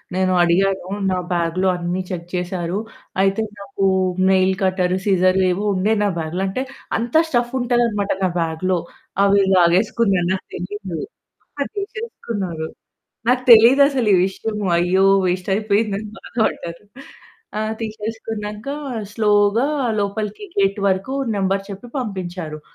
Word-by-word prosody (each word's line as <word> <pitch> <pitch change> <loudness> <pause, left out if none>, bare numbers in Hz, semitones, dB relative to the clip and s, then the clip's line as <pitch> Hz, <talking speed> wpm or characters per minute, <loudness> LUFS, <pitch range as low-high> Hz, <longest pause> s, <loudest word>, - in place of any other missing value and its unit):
నేను 185 0 +2
అడిగాను 190 +2 +2 0.2
నా 185 - 0 0.2
బ్యాగ్‌లో 175 +2 0
అన్ని 175 +1 -2
చెక్ 170 -2 -4
చేసారు. 180 +1 -2 0.4
అయితే 195 +2 +2 0.2
నాకు 200 0 -3 0.4
నైల్ 190 0 +4
కట్టర్, 185 -1 +1
సిజర్ 185 -1 +3
ఏవో 190 +3 -1
ఉండే 195 +4 +2
నా 205 - +2
బ్యాగ్‌లో, 165 +3 -3
అంటే 255 +8 -2 0.3
అంత 235 +1 -4 0.2
స్టఫ్ఫుంటాదనమాట 240 -5 +1
నా 185 - +3
బ్యాగ్‌లో. 170 +3 0 0.5
అవి 200 0 +4
లాగేసుకున్నారు. 185 +1 +3
నాకు 190 - -4
తెలీదు. 185 -1 -5 0.6
ఆ! - - +3 0.2
తీసేసుకున్నారు. 225 - -4 0.6
నాకు 250 +1 +3
తెలీదసలీవిషయము. 220 -5 +4
అయ్యో! 185 +2 +3 0.2
వేస్ట్ 180 +1 -1
అయిపోయిందని 210 0 0
బాధపడ్డాను. 190 -6 -3 0.7
ఆ! - - -1 0.2
తీసేసుకున్నాక 215 0 -5 0.5
స్లో‌గా 210 +3 +3 0.3
లోపలికి 210 - -3
గేట్ 200 +1 +2
వరకు 190 +6 -1 0.2
నంబర్ 195 0 0
చెప్పి 200 +5 -8
పంపించారు. 180 -8 -5
195 Hz, 110 wpm, -20 LUFS, 185-220 Hz, 0.7 s, నైల్